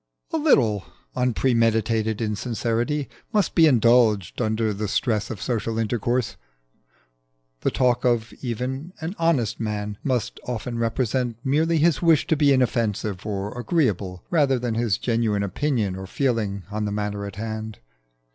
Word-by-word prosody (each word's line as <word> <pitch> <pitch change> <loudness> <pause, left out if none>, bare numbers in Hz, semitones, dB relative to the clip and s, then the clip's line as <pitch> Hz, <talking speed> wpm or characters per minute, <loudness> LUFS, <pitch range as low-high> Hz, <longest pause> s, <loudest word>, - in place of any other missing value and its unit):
A - - +2
little 115 - +3 0.3
unpremeditated 115 -3 +1
insincerity 120 +6 -1 0.2
must 210 -3 +1
be 165 -2 +6
indulged 115 - +3
under 110 -1 0
the 105 +1 -3
stress 110 +1 0
of 110 - -5
social 115 +1 -2
intercourse. 115 -2 -1 1.2
The - - +1
talk 125 -2 +1 0.4
even 130 +7 -4
of - - -12
an 170 +5 -3
honest 155 -10 +1
man 105 -2 -3
must 125 -4 -1
often 120 0 -3
represent 120 0 0
merely 160 +5 +2
his 160 -1 +3
wish 165 -4 +4
to 165 - +2
be 145 -1 +4
inoffensive 110 -6 0
or 100 +1 -3
agreeable 105 - -1
rather 145 -6 +3
than 120 -1 -2
his 115 -4 +1
genuine 115 -4 0
opinion 105 -1 -1
or 95 0 -7
feeling 110 -6 -1
on 105 0 -2
the 105 - -2
matter 105 0 -3
in 100 - -8
hand. 110 0 -5
115 Hz, 140 wpm, -24 LUFS, 105-130 Hz, 1.2 s, be